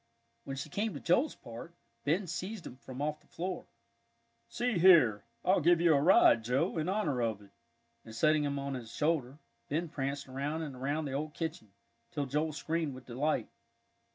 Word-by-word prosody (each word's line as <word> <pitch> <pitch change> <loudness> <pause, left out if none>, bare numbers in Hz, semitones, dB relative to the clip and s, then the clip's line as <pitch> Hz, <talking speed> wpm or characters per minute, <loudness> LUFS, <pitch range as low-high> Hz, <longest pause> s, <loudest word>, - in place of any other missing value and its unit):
When 135 - -4
she 155 - -5
came 210 +6 -2
to - - -5
Joel's 245 - +2
part, 120 +9 -10 0.3
Ben 170 +7 +1
seized 180 +3 -5
him - - -8
from 130 +1 -7
off 150 0 -2
the - - -27
floor. 180 +1 -5 0.8
"See 245 -6 0
here, 155 - +6 0.2
I'll 185 0 +4
give 170 +2 +5
you 170 -1 +5
a 140 - +3
ride, 145 -8 +6
Joe, 135 +9 0
in 155 +3 -1
honor 160 - 0
of 110 -3 0
it," 100 - -19 0.5
and 110 - -11
setting 155 +3 +3
him 140 -1 -1
on 140 0 -3
his 120 -3 -6
shoulder, 145 -2 0 0.3
Ben 165 +3 -1
pranced 140 0 -3
around 140 +5 -3
and 145 -4 -6
around 145 +5 -2
the 140 - -4
old 150 +2 -3
kitchen, 160 - -4 0.4
till 145 -5 -2
Joel 150 +4 0
screamed 155 -1 -2
with 130 - -11
delight. 140 +6 -1
150 Hz, 185 wpm, -32 LUFS, 135-170 Hz, 0.8 s, here